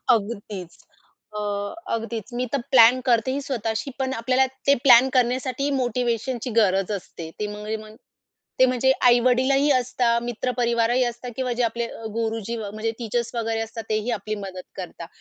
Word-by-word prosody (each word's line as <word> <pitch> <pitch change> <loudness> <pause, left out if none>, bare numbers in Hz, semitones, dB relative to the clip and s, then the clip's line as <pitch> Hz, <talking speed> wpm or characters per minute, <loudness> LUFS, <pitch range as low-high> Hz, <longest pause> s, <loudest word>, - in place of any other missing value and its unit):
अगदीच. 200 -4 -5 0.6
अ, - - -2 0.6
अगदीच 230 0 -5
मी 250 - 0
तर 280 - +1
प्लॅन 245 0 +7
करते 240 0 +2
ही 280 - -2
स्वतःशी 230 -2 -3
पण 265 0 -1
आपल्याला 255 +2 +2 0.2
ते 280 - +7
प्लॅन 260 -1 +7
करण्यासाठी 255 +1 +1
ही 285 - +1
मोटिव्हेशनची 245 0 -1
गरज 195 -1 +2
असते. 170 -4 -6
त्यामुळे 210 +1 -4
मग 215 0 -12 0.6
ते 260 - +8
म्हणजे 255 +1 +2
आई-वडीलही 255 +3 +4
असतात, 245 -2 +1
मित्रपरिवारही 240 0 +1
असतात 240 0 -4
किंवा 255 -1 -1
जे 245 +1 0
आपले 235 0 -1
अ, 225 - -10
गुरुजी 225 0 -2
म्हणजे 215 +1 -3
टीचर्स 235 +1 -2
वगैरे 225 -1 -1
असतात 225 0 -6
तेही 215 +2 0
आपली 215 +2 -4
मदत 185 -1 -7
करतात. 175 -2 -7
235 Hz, 155 wpm, -24 LUFS, 220-255 Hz, 0.6 s, ते